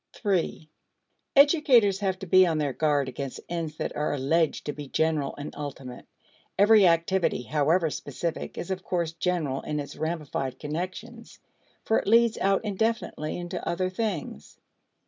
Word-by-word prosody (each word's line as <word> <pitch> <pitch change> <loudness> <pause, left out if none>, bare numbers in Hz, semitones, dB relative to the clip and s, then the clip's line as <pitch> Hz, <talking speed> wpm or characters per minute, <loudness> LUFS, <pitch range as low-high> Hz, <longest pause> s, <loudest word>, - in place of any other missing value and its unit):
(3) 185 -6 -1 0.7
Educators 275 - +5
have 190 -2 -1
to 190 - -7
be 185 +1 +6
on 160 -2 0
their 145 -3 -1
guard 145 -2 +1
against 130 +1 -5
ends 165 -3 -4
that - - -4
are 150 - -1
alleged 155 +4 +1
to 145 - -3
be 145 -1 -8
general 155 -1 0
and 145 +1 -8
ultimate. 135 -4 -8 0.5
Every 205 0 +6
activity, 170 -4 +1
however 155 +4 +1
specific, 155 +5 -5
is, 175 - -5
of 185 -1 -3
course, 170 -3 -1
general 165 -5 -1
in 150 -1 -3
its 145 0 -6
ramified 150 -5 -3
connections, 185 - -6 0.5
for 220 - +2
it - - -7
leads 230 +1 +4
out 195 +2 +1
indefinitely 210 -6 -2
into 175 0 -5
other 185 +2 -1
things. 185 - -4
170 Hz, 150 wpm, -27 LUFS, 150-195 Hz, 0.7 s, be